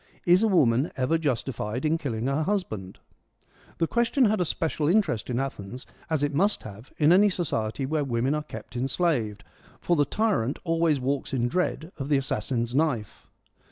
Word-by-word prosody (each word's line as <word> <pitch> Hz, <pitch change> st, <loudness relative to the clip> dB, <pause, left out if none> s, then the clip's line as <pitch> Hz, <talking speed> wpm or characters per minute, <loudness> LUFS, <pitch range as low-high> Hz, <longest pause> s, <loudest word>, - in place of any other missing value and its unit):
'Is 180 Hz, +2 st, +5 dB
a 225 Hz, -, +4 dB
woman 140 Hz, -, +3 dB
ever 130 Hz, +5 st, +1 dB
justified 125 Hz, -4 st, -2 dB
in 155 Hz, +1 st, +3 dB
killing 115 Hz, -6 st, -3 dB
hex 140 Hz, +3 st, 0 dB
husband? 110 Hz, -, -3 dB, 0.4 s
' -, -, -29 dB
The 165 Hz, -, +2 dB
question 240 Hz, -, +2 dB
had 215 Hz, -3 st, +2 dB
a -, -, +2 dB
special 155 Hz, -2 st, -1 dB
interest 170 Hz, -, +1 dB
in 120 Hz, 0 st, 0 dB
Athens, 125 Hz, -3 st, -5 dB, 0.2 s
as 155 Hz, -3 st, 0 dB
it 145 Hz, 0 st, 0 dB
must 200 Hz, +8 st, +1 dB
have 110 Hz, +4 st, -11 dB
in 150 Hz, +1 st, +4 dB
any 200 Hz, +3 st, +6 dB
society 135 Hz, -, -2 dB
where 150 Hz, +2 st, 0 dB
women 125 Hz, +1 st, 0 dB
are 150 Hz, -, -1 dB
kept 150 Hz, -, -10 dB
enslaved, 125 Hz, -, -1 dB, 0.4 s
for 175 Hz, -, +1 dB
the 145 Hz, -, +4 dB
tyrant 190 Hz, -, 0 dB
always 165 Hz, -3 st, +2 dB
walks 135 Hz, +1 st, -2 dB
in 120 Hz, -1 st, +1 dB
dread 170 Hz, +3 st, -1 dB
of 135 Hz, +1 st, -4 dB
the 145 Hz, -, +4 dB
assassin's 130 Hz, -3 st, -2 dB
knife. 135 Hz, -7 st, -1 dB
140 Hz, 180 wpm, -26 LUFS, 125-170 Hz, 0.4 s, any